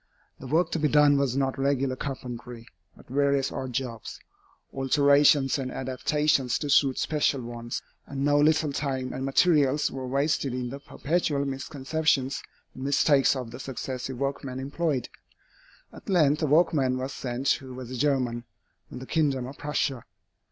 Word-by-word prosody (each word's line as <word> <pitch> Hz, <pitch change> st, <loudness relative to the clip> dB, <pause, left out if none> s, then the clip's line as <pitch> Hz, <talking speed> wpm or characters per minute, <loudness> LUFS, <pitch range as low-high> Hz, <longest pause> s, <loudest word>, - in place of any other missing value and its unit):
The 130 Hz, -, -8 dB
work 160 Hz, +7 st, +1 dB
to 165 Hz, -, -1 dB
be 150 Hz, -, +2 dB
done 145 Hz, 0 st, +5 dB
was 135 Hz, -2 st, 0 dB
not 135 Hz, -1 st, -1 dB
regular 135 Hz, -1 st, +1 dB
carpentry, 125 Hz, -3 st, -7 dB, 0.3 s
but -, -, -17 dB
various 140 Hz, 0 st, +1 dB
odd 130 Hz, -1 st, -4 dB
jobs, 120 Hz, -3 st, -4 dB, 0.5 s
alterations 140 Hz, 0 st, +4 dB
and 130 Hz, -1 st, -3 dB
adaptations 130 Hz, 0 st, 0 dB
to 145 Hz, -2 st, -3 dB
suit 135 Hz, -2 st, +4 dB
special 145 Hz, -3 st, 0 dB
wants, 120 Hz, 0 st, -6 dB, 0.2 s
and 140 Hz, 0 st, -3 dB
no 145 Hz, 0 st, +4 dB
little 155 Hz, -1 st, +3 dB
time 130 Hz, -3 st, -2 dB
and 130 Hz, -, -4 dB
materials 145 Hz, 0 st, +3 dB
were 130 Hz, -1 st, -5 dB
wasted 140 Hz, -1 st, 0 dB
in 125 Hz, -1 st, -3 dB
the 140 Hz, -, -6 dB
perpetual 145 Hz, -1 st, -1 dB
misconceptions 135 Hz, 0 st, -1 dB, 0.3 s
and 130 Hz, -, -8 dB
mistakes 140 Hz, 0 st, +3 dB
of 125 Hz, -3 st, -5 dB
the 120 Hz, -, -9 dB
successive 130 Hz, -1 st, -5 dB
workmen 135 Hz, -1 st, -3 dB
employed. 140 Hz, -1 st, -2 dB, 0.9 s
At -, -, -12 dB
length 155 Hz, -5 st, +3 dB
a 155 Hz, -, +1 dB
workman 145 Hz, -4 st, +3 dB
was 130 Hz, +1 st, -4 dB
sent 130 Hz, +2 st, -3 dB
who 130 Hz, -2 st, -1 dB
was 125 Hz, -1 st, -8 dB
a -, -, -4 dB
German, 125 Hz, -3 st, 0 dB, 0.4 s
from -, -, -8 dB
the 130 Hz, -, -8 dB
kingdom 140 Hz, -4 st, 0 dB
of 135 Hz, +2 st, -10 dB
Prussia. 140 Hz, -4 st, -2 dB
135 Hz, 160 wpm, -27 LUFS, 130-145 Hz, 0.9 s, done